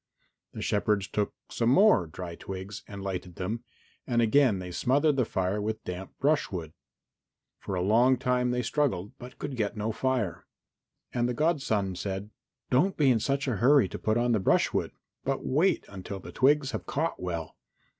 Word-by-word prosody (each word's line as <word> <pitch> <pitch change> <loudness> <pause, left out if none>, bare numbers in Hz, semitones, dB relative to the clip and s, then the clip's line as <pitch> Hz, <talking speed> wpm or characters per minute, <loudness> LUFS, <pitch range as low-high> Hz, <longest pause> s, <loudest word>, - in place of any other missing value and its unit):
The - - -5
shepherds 105 -2 +1
took 105 0 -2 0.2
some 115 0 +1
more 135 - +5
dry 85 +2 -7
twigs 95 +3 -7
and 100 -1 -8
lighted 90 -2 -4
them, 110 +6 -3 0.4
and 120 -3 +1
again 120 -1 +4
they 90 -1 -6
smothered 140 - +2
the 130 -3 +2
fire 95 0 -1
with 110 +1 -3
damp 90 +1 -6
brushwood. 95 - 0 0.9
For 95 - -4
a 90 - 0
long 120 +6 +4
time 125 0 +1
they 125 0 0
struggled, 115 -7 0
but 125 +1 -10
could 140 -2 -5
get 110 -1 -2
no 105 +2 -1
fire. 120 -6 -1 0.7
And 120 0 +1
the 125 - -2
godson 135 - +1
said, 100 +3 -4 0.4
"Don't 180 +10 +3
be 140 -4 +5
in 115 - +3
such 140 +4 -1
a 120 -6 0
hurry 130 +1 +5
to - - -6
put 110 +1 +1
on 120 +1 +2
the 110 - +3
brushwood, 95 - +2 0.3
but 135 0 -2
wait 155 +9 +2
until 95 0 -7
the 85 -1 -10
twigs 140 - +3
have - - -5
caught 160 +4 -2
well. 85 -3 -4
110 Hz, 175 wpm, -28 LUFS, 95-130 Hz, 0.9 s, more